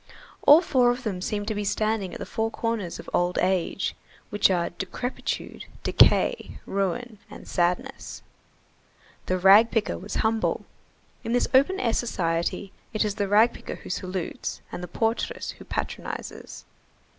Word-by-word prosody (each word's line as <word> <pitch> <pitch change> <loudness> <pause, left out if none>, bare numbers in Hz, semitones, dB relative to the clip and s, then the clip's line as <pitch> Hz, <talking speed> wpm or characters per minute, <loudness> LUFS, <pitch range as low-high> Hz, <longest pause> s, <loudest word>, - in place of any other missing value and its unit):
All 300 +4 +10
four 255 -8 +3
of 245 +1 -1
them 195 -6 -3
seemed 205 +1 -2
to - - 0
be 210 0 -2
standing 215 -2 0
at - - -6
the - - -5
four 225 0 -1
corners 225 -6 -3
of - - -10
old 175 0 +1
age, 185 +1 0 0.4
which 205 -1 +4
are 175 -2 0
decrepitude, 195 +8 -4 0.2
decay, 480 - +3
ruin, 210 +3 -2
and - - -11
sadness. 180 +10 -2 1.0
The 185 - +1
rag 195 +5 +7
picker 225 -2 -1
was 200 +3 -7
humble. 220 0 0 0.6
In 230 0 -2
this 245 - +2
open 280 +9 +4
air 230 -2 +1
society, 170 -3 -1 0.2
it 215 0 +1
is 210 - -1
the 205 -1 -1
rag 215 +4 +5
picker - - -7
who - - -9
salutes 185 -1 -4
and - - -6
the 180 - -5
portress 225 +6 -2
who - - -11
patronizes. - - -5
210 Hz, 155 wpm, -26 LUFS, 185-230 Hz, 1.0 s, All